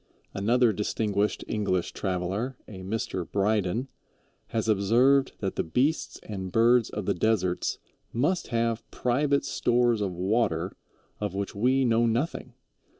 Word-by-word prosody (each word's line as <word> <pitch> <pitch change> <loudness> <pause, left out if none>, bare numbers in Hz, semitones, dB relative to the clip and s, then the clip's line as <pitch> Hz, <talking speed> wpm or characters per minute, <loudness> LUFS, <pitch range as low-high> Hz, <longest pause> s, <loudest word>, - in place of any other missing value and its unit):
Another 115 +3 +3
distinguished 105 0 -1
English 100 -5 -1
traveler, 95 +7 -2
a 95 -3 -9
Mr. 95 -3 -3
Bryden, 105 +3 +1 0.6
has 110 -1 -2
observed 120 +7 +3
that 95 -2 -3
the - - +1
beasts 130 - 0
and 95 -3 -6
birds 115 +2 +4
of 105 -2 -5
the - - +2
deserts 90 -2 0 0.3
must 150 +10 0
have 115 -1 0
private 140 +3 +1
stores 120 -2 +2
of 100 -2 -1
water 95 -2 0 0.4
of 105 -3 -3
which 100 0 -3
we 130 +6 +2
know 115 0 +3
nothing. 120 +9 -2
110 Hz, 130 wpm, -27 LUFS, 95-120 Hz, 0.6 s, birds